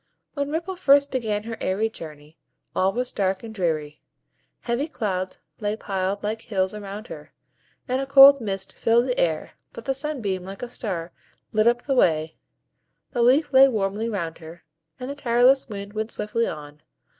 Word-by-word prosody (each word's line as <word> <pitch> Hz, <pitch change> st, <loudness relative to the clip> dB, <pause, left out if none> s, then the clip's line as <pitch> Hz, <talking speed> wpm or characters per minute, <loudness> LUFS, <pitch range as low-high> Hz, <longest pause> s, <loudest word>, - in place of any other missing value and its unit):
When 285 Hz, -1 st, -2 dB
Ripple 340 Hz, +5 st, -3 dB
first 280 Hz, -4 st, +4 dB
began 215 Hz, -5 st, -1 dB
her 225 Hz, 0 st, -6 dB
airy 195 Hz, +4 st, 0 dB
journey, 155 Hz, -6 st, -10 dB, 0.4 s
all 190 Hz, +1 st, +2 dB
was 250 Hz, +4 st, -3 dB
dark 190 Hz, 0 st, -1 dB
and 225 Hz, -1 st, -8 dB
dreary; 155 Hz, -6 st, -2 dB, 0.6 s
heavy 240 Hz, +5 st, -1 dB
clouds 185 Hz, -, -3 dB, 0.2 s
lay 210 Hz, -1 st, -1 dB
piled 195 Hz, -1 st, -3 dB
like 215 Hz, +2 st, -2 dB
hills 190 Hz, -2 st, -1 dB
around 205 Hz, +1 st, -7 dB
her, -, -, -10 dB, 0.5 s
and 255 Hz, +1 st, 0 dB
a 270 Hz, -, -4 dB
cold 275 Hz, 0 st, +9 dB
mist 195 Hz, -3 st, -4 dB
filled 235 Hz, +2 st, +2 dB
the 250 Hz, -1 st, -1 dB
air 160 Hz, -2 st, 0 dB, 0.2 s
but 230 Hz, -, -9 dB
the 270 Hz, -, +1 dB
Sunbeam, 255 Hz, -10 st, -3 dB
like 195 Hz, +4 st, -8 dB
a 245 Hz, -, -5 dB
star, 180 Hz, -8 st, -4 dB, 0.4 s
lit 215 Hz, +1 st, +3 dB
up 240 Hz, 0 st, +2 dB
the 275 Hz, -, 0 dB
way, 160 Hz, -9 st, +2 dB, 0.8 s
the 240 Hz, -, -1 dB
leaf 275 Hz, +5 st, +3 dB
lay 265 Hz, +1 st, +8 dB
warmly 215 Hz, -1 st, -1 dB
round 170 Hz, -7 st, -4 dB
her, 165 Hz, +1 st, -12 dB, 0.4 s
and 250 Hz, -, -5 dB
the 280 Hz, -, -4 dB
tireless 255 Hz, 0 st, +3 dB
wind 200 Hz, -1 st, -7 dB
went 215 Hz, +1 st, -3 dB
swiftly 230 Hz, +1 st, -1 dB
on. 150 Hz, -1 st, -8 dB
215 Hz, 175 wpm, -24 LUFS, 190-250 Hz, 0.8 s, cold